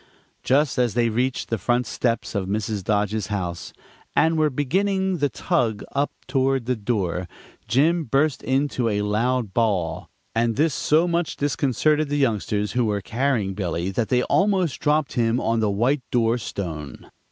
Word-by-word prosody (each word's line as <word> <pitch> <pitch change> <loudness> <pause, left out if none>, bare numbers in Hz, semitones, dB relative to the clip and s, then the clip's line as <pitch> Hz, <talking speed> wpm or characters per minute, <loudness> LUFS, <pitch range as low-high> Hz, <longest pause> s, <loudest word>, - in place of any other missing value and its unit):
Just 140 0 +2
as 120 -4 +1
they 120 -1 +2
reached 125 +3 -1
the 115 - -1
front 120 +5 +1
steps 120 -1 -1
of 100 -3 -2
Mrs. 105 -1 -2
Dodge's 105 0 0
house, 90 -4 -4 0.4
and 160 0 +3
were 155 -1 +3
beginning 190 +7 0
the 145 -2 +1
tug 110 -2 -1
up 140 +1 0
toward 135 -2 +1
the 125 +1 0
door, 95 -6 -2 0.4
Jim 160 +7 +2
burst 140 +4 +1
into 130 -3 0
a 105 -1 0
loud 110 +1 0
bawl, 100 -8 0 0.2
and 115 0 +1
this 155 +1 +2
so 160 +6 +2
much 170 -1 -1
disconcerted 145 +2 +1
the 145 - 0
youngsters 105 -5 0
who 125 -1 +1
were 105 -2 -1
carrying 115 -3 0
Billy 90 -1 -2
that 110 +3 -1
they 125 0 +2
almost 190 -6 +1
dropped 150 -1 +1
him 115 -1 +1
on 115 -1 0
the 110 -2 +1
white 120 +8 +1
door 120 0 +2
stone. 80 -9 -6
120 Hz, 165 wpm, -23 LUFS, 105-145 Hz, 0.4 s, and